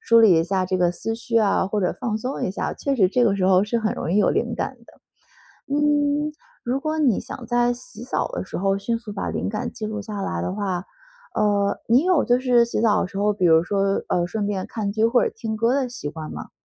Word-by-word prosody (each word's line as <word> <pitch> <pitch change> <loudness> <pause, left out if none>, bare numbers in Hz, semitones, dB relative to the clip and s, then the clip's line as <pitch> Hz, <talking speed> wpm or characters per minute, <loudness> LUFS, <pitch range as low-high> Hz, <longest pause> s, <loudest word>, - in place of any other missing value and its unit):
梳 230 0 +4
理 190 -8 +6
一 - - +2
下 185 +1 0
这 185 0 -1
个 175 -1 +3
思 225 +5 -4
绪 230 0 -3
啊， 205 -3 +3
或 210 +2 -2
者 180 - 0
放 230 -4 -1
松 250 +5 -4
一 - - 0
下， 195 - -3
确 275 -1 -2
实 190 -5 +5
这 245 +6 +1
个 200 -4 +3
时 185 - 0
候 190 0 +5
是 230 +3 0
很 220 -1 0
容 165 - -4
易 195 - +2
有 210 - +4
灵 - - -1
感 - - -4
的。 - - -18 0.8
嗯， 295 0 +1 0.3
如 250 +3 -1
果 310 +2 -2
你 255 -9 +3
想 250 - -7
在 240 +1 +2
洗 250 - -10
澡 - - -1
的 - - -4
时 - - -7
候 195 +1 +1
迅 230 +3 -1
速 225 -3 -8
把 200 - -3
灵 - - -2
感 210 0 -3
记 225 -3 -7
录 215 0 -3
下 205 -1 -5
来 85 - -2
的 90 - -2
话， 190 -3 -2 0.5
呃， 200 -1 +1
你 245 +5 +4
有 365 -6 +3
就 245 0 +2
是 245 -2 +4
洗 235 -2 -2
澡 215 -2 +3
的 - - -2
时 195 - -10
候， 210 +1 +2
比 200 -3 -2
如 160 0 +6
说， 195 +1 0
呃， 175 -1 +1
顺 205 +3 -2
便 190 -2 -2
看 210 -3 -3
剧 220 +2 0
或 245 +1 +3
者 - - -1
听 225 -1 -4
歌 230 +3 +2
的 270 -2 0
习 240 -12 -6
惯 155 0 -7
吗？ - - -8
215 Hz, 280 characters per minute, -23 LUFS, 195-240 Hz, 0.8 s, 理